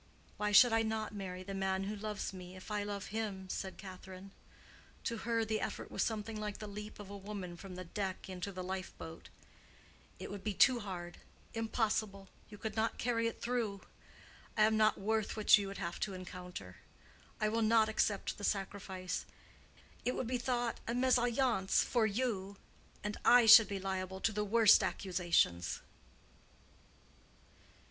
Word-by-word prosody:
"Why 210 0 0
should 230 +3 +8
I 225 - +4
not 220 -1 -2
marry 185 -2 -5
the 195 +1 -6
man 190 0 0
who 205 +2 -3
loves 210 -1 -4
me, 180 0 -9
if 185 +3 -10
I 210 -1 0
love 205 -1 -4
him?" 205 -4 -3
said 190 0 -4
Catherine. 190 0 -10 0.7
To 230 - -2
her 230 0 0
the 215 0 -1
effort - - -4
was - - -2
something 220 0 -2
like 210 -1 -4
the 215 - -7
leap 210 +1 -7
of 200 -1 -9
a - - -6
woman 195 -3 -6
from 185 +1 -9
the 185 - -6
deck 190 +2 -4
into 185 +1 -5
the 185 -1 -6
lifeboat. 185 -3 -6 0.9
"It - - -7
would 200 -1 -7
be 210 -2 -2
too 255 +4 +6
hard—impossible—you 205 +2 -4
could 215 0 -5
not 225 0 0
carry 230 -1 +1
it 230 - -6
through. 230 -5 -1 0.8
I 215 - +6
am 220 +1 +4
not 215 0 +4
worth 220 +2 -1
what 215 - +7
you 200 - -3
would 195 - -6
have 175 -2 -4
to 195 -2 -2
encounter. 180 - -8 0.6
I 215 - +2
will 225 +1 0
not 220 0 +5
accept 210 -2 0
the - - -8
sacrifice. 195 -2 -2 0.8
It 250 - 0
would 255 - -2
be 250 +2 -1
thought 240 -1 -1
a 230 - 0
mésalliance 245 -4 +3
for 230 -3 +2
you 200 -3 -2 0.5
and 210 0 -3
I 245 -1 +7
should 220 0 +10
be 200 -1 -3
liable 190 0 -3
to 225 - +2
the 210 0 -1
worst 220 +1 +6
accusations." 175 - +1
205 Hz, 165 wpm, -34 LUFS, 190-220 Hz, 0.9 s, should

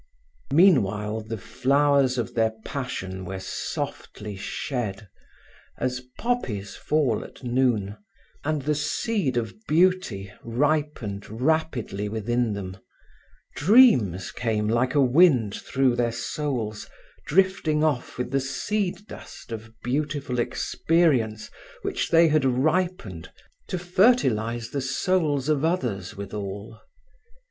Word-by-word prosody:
Meanwhile 110 - +3
the 110 +1 -5
flowers 140 +3 +2
of 120 - -2
their 110 -1 +1
passion 95 -9 -4
were 95 +1 -5
softly 100 +2 -5
shed, 105 0 -4 0.7
as 125 0 -2 0.2
poppies 120 - -2
fall 145 -8 0
at - - -14
noon, 120 -5 +1 0.5
and 150 -1 -1
the 150 +2 +1
seed 150 - -1
of 115 -2 -2
beauty 160 - +1
ripened 130 -5 -1
rapidly 120 -5 -1
within 115 +1 0
them. 95 -2 -6 0.8
Dreams 145 - +5
came 110 -3 -1
like 125 +5 +1
a 145 - +5
wind 130 - +4
through, 130 -2 +1
their 120 -1 +1
souls, 120 -2 -3 0.4
drifting 170 -4 +2
off 145 -6 -1
with 125 0 -3
the 135 0 +1
seed 195 +7 -2
dust 120 - -11
of 110 0 -7
beautiful 135 -1 -2
experience 125 -5 +1 0.3
which - - -2
they 165 0 +6
had 155 -2 +3
ripened, 135 - 0 0.4
to 185 - -2
fertilize 130 - +2
the 140 - -2
souls 145 0 0
of 150 -2 +1
others 110 - -1
withal. 100 +2 -6
125 Hz, 110 wpm, -25 LUFS, 110-155 Hz, 0.8 s, they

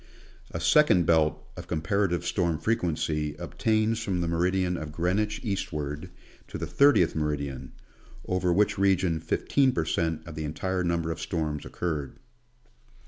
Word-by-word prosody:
A - - -5
second 110 - +4
belt 80 -2 +2
of - - -9
comparative 85 +2 0
storm 85 -3 0
frequency 75 -5 -1
obtains 110 0 0
from 95 -5 -1
the 85 - -1
meridian 90 +2 +1
of 80 -3 -5
Greenwich 95 +7 0
eastward 75 - -3 0.4
to - - -6
the - - -3
30th 140 - +4
meridian; 70 -4 -3 0.5
over 90 -1 0
which 100 +2 +2
region 95 -4 +2
15 135 - +1
per 80 - 0
cent, 80 0 -1
of 85 - -8
the 80 0 -5
entire 90 +5 -2
number 85 -1 0
of - - -5
storms 75 -3 -2
occurred. 75 -6 -4
85 Hz, 140 wpm, -27 LUFS, 80-95 Hz, 0.5 s, second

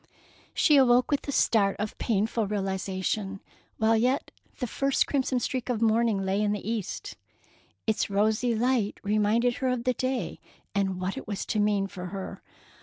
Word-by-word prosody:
She 300 -3 +5
awoke 250 0 +5
with 285 - 0
a - - -1
start 205 -7 +3
of 215 0 -3
painful 220 0 0
realization, 195 0 -2 0.4
while 220 +1 +3
yet 250 +5 +1 0.3
the 250 - -2
first 275 +3 +1
crimson 265 -2 0
streak 255 0 -3
of 240 -3 0
morning 225 -3 +2
lay 195 +2 +1
in 210 -1 +1
the 210 - -5
east. 220 -4 -4 0.7
Its 220 -1 0
rosy 215 +4 +2
light 235 -2 +1
reminded 215 +4 +2
her 265 - -1
of 250 -2 0
the 255 0 +2
day, 255 +1 -2 0.3
and 195 -3 0
what 185 +1 -3
it - - -7
was 205 -1 -3
to 215 - -1
mean 205 -1 +2
for 180 -2 -7
her. 195 +1 -6
220 Hz, 170 wpm, -27 LUFS, 200-245 Hz, 0.7 s, She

